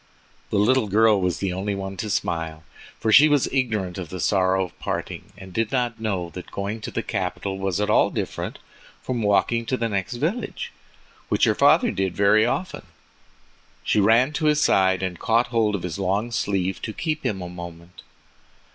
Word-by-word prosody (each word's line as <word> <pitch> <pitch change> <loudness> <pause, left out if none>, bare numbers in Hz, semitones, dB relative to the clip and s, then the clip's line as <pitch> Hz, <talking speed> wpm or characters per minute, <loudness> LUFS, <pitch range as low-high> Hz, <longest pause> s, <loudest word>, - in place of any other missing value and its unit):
The - - 0
little 115 +3 +3
girl 105 0 +4
was 90 -1 0
the 95 -2 -2
only 100 +2 -2
one 95 0 -5
to 105 - -4
smile, 80 -4 -2 0.4
for 110 - 0
she 150 +6 +8
was 145 -3 +3
ignorant 110 -9 -1
of 90 -4 -6
the 95 - -6
sorrow 95 +1 +2
of 90 - -15
parting, - - -4
and 95 -2 -11
did 115 +2 -1
not 120 -3 -1
know 95 -6 -2
that 90 - -9
going 100 +3 -4
to - - -5
the 115 - -3
capital 95 -1 -3
was 95 0 -1
at 105 - +1
all - - +4
different - - -4 0.5
from 125 -2 -2
walking 110 +3 +2
to 130 - 0
the 115 - -1
next 100 +2 -2
village, 185 - -3 0.6
which - - +1
her - - +5
father - - +4
did 95 -2 -2
very 105 +3 +4
often. 180 +9 -3 1.0
She - - +2
ran 115 +8 +4
to 155 +1 -2
his 150 0 +3
side, 95 -9 +3
and 90 -3 -3
caught 115 +2 +2
hold 110 -3 +1
of 95 - -5
his 90 0 -4
long 100 +5 0
sleeve 95 -4 -1
to 110 - -4
keep 155 +3 -3
him 95 - -1
a - - -5
moment. 85 0 -10
100 Hz, 190 wpm, -23 LUFS, 95-115 Hz, 1.0 s, she